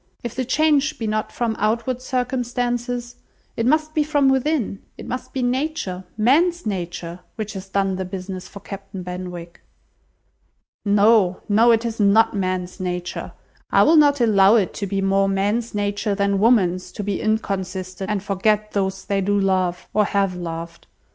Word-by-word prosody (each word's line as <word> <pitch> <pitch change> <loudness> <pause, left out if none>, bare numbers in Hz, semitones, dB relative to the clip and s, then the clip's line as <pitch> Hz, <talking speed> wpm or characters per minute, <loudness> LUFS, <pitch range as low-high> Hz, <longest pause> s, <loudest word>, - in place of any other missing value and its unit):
If 240 - -4
the 260 - -2
change 305 +2 +2
be 225 - -4
not 215 0 -1
from 230 -2 -1
outward 235 +4 0
circumstances, 245 -1 -2 0.4
it 230 - 0
must 310 +2 +2
be 305 - +2
from 290 -2 +2
within; 265 -6 0 0.2
it - - -9
must 255 +1 -5
be 260 -1 -2
nature, 245 -8 -2
man's 330 +10 +3
nature, 175 -3 -4 0.2
which 215 -1 -5
has 190 -1 -8
done 195 -1 0
the 190 - -2
business 185 0 -6
for 200 - -11
Captain 195 -1 -8
Benwick." 180 -1 -7 1.2
"No, 205 -2 +4
no, 220 +3 +4
it 230 0 +3
is 230 -1 -4
not 210 +2 +4
man's 185 -1 -2
nature. 180 -1 -4 0.4
I - - +5
will 325 - +5
not 290 -2 +5
allow 210 -3 +5
it 205 -5 +1
to 200 - -4
be 195 0 -1
more 195 0 +2
man's 205 +4 -1
nature 205 0 -1
than 200 -1 +1
woman's 185 -5 +2
to 205 - -5
be 200 -1 -2
inconstant 190 -3 -2
and 205 -2 -1
forget 210 +2 0
those 190 -1 -2
they 200 -1 0
do 205 +1 +1
love, 185 -2 0
or 210 -1 +3
have 195 -2 0
loved. 170 -1 -7
205 Hz, 165 wpm, -22 LUFS, 190-240 Hz, 1.2 s, I